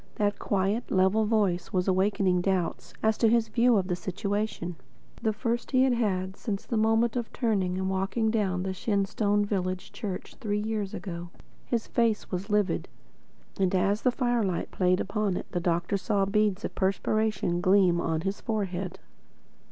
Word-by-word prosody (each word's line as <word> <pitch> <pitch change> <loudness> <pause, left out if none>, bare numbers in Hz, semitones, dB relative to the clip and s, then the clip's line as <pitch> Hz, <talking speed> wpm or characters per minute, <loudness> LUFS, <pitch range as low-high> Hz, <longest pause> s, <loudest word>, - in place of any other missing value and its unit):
That 205 -1 0
quiet, 200 +4 0
level 190 +4 +3
voice 205 -5 +1
was 180 0 0
awakening 190 -1 +2
doubts 185 -2 -1
as 220 0 +2
to 225 - +5
his 230 -1 +2
view 235 +1 +4
of 185 -2 0
the 180 - 0
situation, 200 -1 -3 0.5
the 220 -2 +1
first 230 +3 -2
he 260 -1 +4
had 265 -1 +3
had 190 -5 -1
since 200 -3 -4
the 235 - -3
moment 225 +2 +2
of 240 -2 -3
turning 195 -7 0
and 190 0 -1
walking 195 +4 0
down 190 -5 0
the 190 0 -2
Shenstone 205 +1 +1
village 185 -2 -2
church 195 -4 -6
three 205 -3 -1
years 210 -2 -2
ago. 175 -2 -6 0.4
His 235 -2 -1
face 230 -3 0
was 185 +2 -3
livid, 210 -2 +1 0.7
and 190 -1 +2
as 200 +3 +2
the 255 - +3
firelight 240 -8 0
played 185 0 +2
upon 200 -2 -1
it - - -5
the 175 - -1
doctor 175 +3 0
saw 200 0 +1
beads 210 0 +1
of - - -4
perspiration 195 -2 0
gleam 185 -2 +4
on 160 -1 -1
his 195 +3 -3
forehead. 190 -5 -3
200 Hz, 165 wpm, -28 LUFS, 185-220 Hz, 0.7 s, to